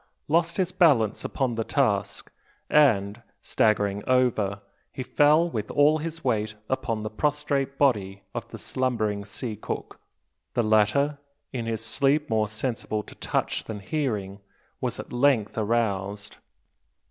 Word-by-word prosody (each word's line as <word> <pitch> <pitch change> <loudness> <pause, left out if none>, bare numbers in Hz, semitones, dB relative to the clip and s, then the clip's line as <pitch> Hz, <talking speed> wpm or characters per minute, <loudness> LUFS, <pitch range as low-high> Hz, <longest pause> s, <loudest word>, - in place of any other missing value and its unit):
lost 170 +2 +1
his 185 -2 +1
balance 140 - +3
upon 130 -3 -1
the 115 0 -1
task, 100 -7 0 0.4
and, 110 -7 +3 0.2
staggering 105 -2 +1
over, 120 -6 +2 0.3
he 130 - -5
fell 150 +5 +4
with 110 -10 -4
all 150 +2 +4
his 165 +1 -5
weight 110 -4 0
upon 115 -4 -1
the 110 - -3
prostrate 140 +1 -1
body 100 -8 +1
of - - -5
the - - -8
slumbering 110 -6 -1
sea 110 +3 -6
cook. 105 - -6 0.6
The 120 - +2
latter, 110 +7 +2 0.3
in 120 -3 -3
his 115 0 -2
sleep 140 +6 +1
more 110 -1 +2
sensible 110 -1 -3
to - - -13
touch - - -2
than 110 -2 -6
hearing, 105 -5 -2 0.4
was - - -3
at - - -8
length 120 -4 +2
aroused. 105 -3 -1
115 Hz, 135 wpm, -26 LUFS, 105-140 Hz, 0.6 s, fell